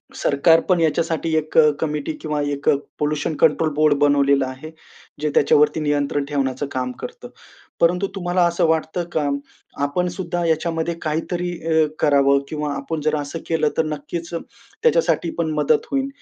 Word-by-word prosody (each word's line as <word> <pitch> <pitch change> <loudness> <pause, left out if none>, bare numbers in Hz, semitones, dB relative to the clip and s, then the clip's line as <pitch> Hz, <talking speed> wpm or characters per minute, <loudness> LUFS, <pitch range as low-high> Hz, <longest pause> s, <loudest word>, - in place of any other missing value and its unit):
सरकार 160 +4 +4
पण 180 -2 +4
याच्यासाठी 165 0 0
एक 155 0 -2
अ, 155 -1 +7
कमिटी 150 -1 -2
किंवा 150 -1 -2 0.6
पोल्युशन 150 +1 -1
कंट्रोल 160 - +4
बोर्ड 155 0 +4
बनवलेलं 140 -1 +3
आहे, 130 +4 -8 0.5
जे 150 - 0
त्याच्यावरती 150 +1 +4
नियंत्रण 145 -1 0
ठेवण्याचं 140 -1 -2
काम 125 -1 -2
करतं. - - -8 0.5
परंतु 180 +3 +2
तुम्हाला 180 -1 +1
असं 170 0 +1
वाटतं 160 +2 0
का 150 -2 0 0.6
आपण 160 +6 0
सुद्धा 175 -2 -3
याच्यामध्ये 165 +1 0
काहीतरी 170 +3 -2 0.2
अ, 160 -1 +4
करावं 140 -1 +4
किंवा 150 -1 -3
आपण 145 +3 -4
जर 155 - +2
असं 145 +3 -5
केलं 160 -2 +1
तर 160 - +2
नक्कीच 155 +3 -5
त्याच्यासाठी 455 - -1
पण 165 -2 0
मदत 150 +1 +2
होईल? 275 0 0
155 Hz, 150 wpm, -21 LUFS, 145-165 Hz, 0.6 s, अ